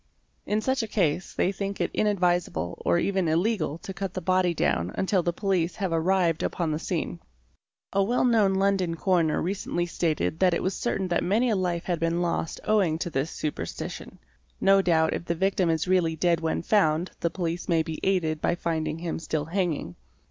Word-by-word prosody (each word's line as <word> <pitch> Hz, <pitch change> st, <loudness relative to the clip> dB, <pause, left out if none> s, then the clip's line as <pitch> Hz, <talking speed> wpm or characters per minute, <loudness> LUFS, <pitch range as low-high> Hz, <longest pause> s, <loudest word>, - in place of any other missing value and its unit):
In 210 Hz, +1 st, +1 dB
such 260 Hz, +3 st, 0 dB
a 225 Hz, -, -3 dB
case 180 Hz, -5 st, 0 dB
they 185 Hz, -, +2 dB
think 200 Hz, 0 st, -4 dB
it -, -, 0 dB
inadvisable 180 Hz, -, 0 dB
or -, -, +3 dB
even 190 Hz, 0 st, +1 dB
illegal 165 Hz, -1 st, 0 dB
to 195 Hz, +2 st, -8 dB
cut 195 Hz, -1 st, -5 dB
the -, -, -1 dB
body 185 Hz, 0 st, +2 dB
down 90 Hz, -, 0 dB
until 190 Hz, -1 st, +1 dB
the 175 Hz, -, 0 dB
police 185 Hz, -2 st, 0 dB
have 190 Hz, -4 st, -2 dB
arrived 170 Hz, 0 st, +2 dB
upon 170 Hz, -3 st, -1 dB
the 150 Hz, -, -1 dB
scene. 170 Hz, 0 st, -3 dB, 0.7 s
A 195 Hz, -, +3 dB
well 240 Hz, +6 st, +2 dB
known 215 Hz, -5 st, +3 dB
London 190 Hz, -3 st, +1 dB
coroner 165 Hz, -3 st, +1 dB
recently 175 Hz, -1 st, -2 dB
stated 165 Hz, -2 st, -1 dB
that 185 Hz, -2 st, +4 dB
it -, -, -2 dB
was 185 Hz, -, 0 dB
certain 195 Hz, -5 st, -1 dB
that 175 Hz, -, +1 dB
many 225 Hz, +6 st, +2 dB
a -, -, +2 dB
life 175 Hz, -3 st, -1 dB
had 175 Hz, -3 st, -2 dB
been 165 Hz, +1 st, 0 dB
lost 170 Hz, -2 st, -1 dB
owing 195 Hz, -7 st, +2 dB
to 175 Hz, +1 st, -4 dB
this 135 Hz, +3 st, -1 dB
superstition. 155 Hz, -2 st, -5 dB, 0.4 s
No 195 Hz, 0 st, +5 dB
doubt 160 Hz, -3 st, +2 dB
if -, -, -4 dB
the 170 Hz, -, -1 dB
victim 190 Hz, 0 st, +1 dB
is 160 Hz, +1 st, 0 dB
really 180 Hz, -3 st, +2 dB
dead 170 Hz, +1 st, +2 dB
when 160 Hz, +1 st, -1 dB
found 170 Hz, -4 st, +2 dB
the 170 Hz, -, 0 dB
police 170 Hz, 0 st, -3 dB
may 165 Hz, -2 st, +3 dB
be 160 Hz, 0 st, -5 dB
aided 160 Hz, -5 st, 0 dB
by -, -, +1 dB
finding 160 Hz, -2 st, -2 dB
him 165 Hz, 0 st, -4 dB
still 155 Hz, -2 st, -2 dB
hanging. 165 Hz, -, -2 dB
175 Hz, 195 wpm, -26 LUFS, 165-195 Hz, 0.7 s, No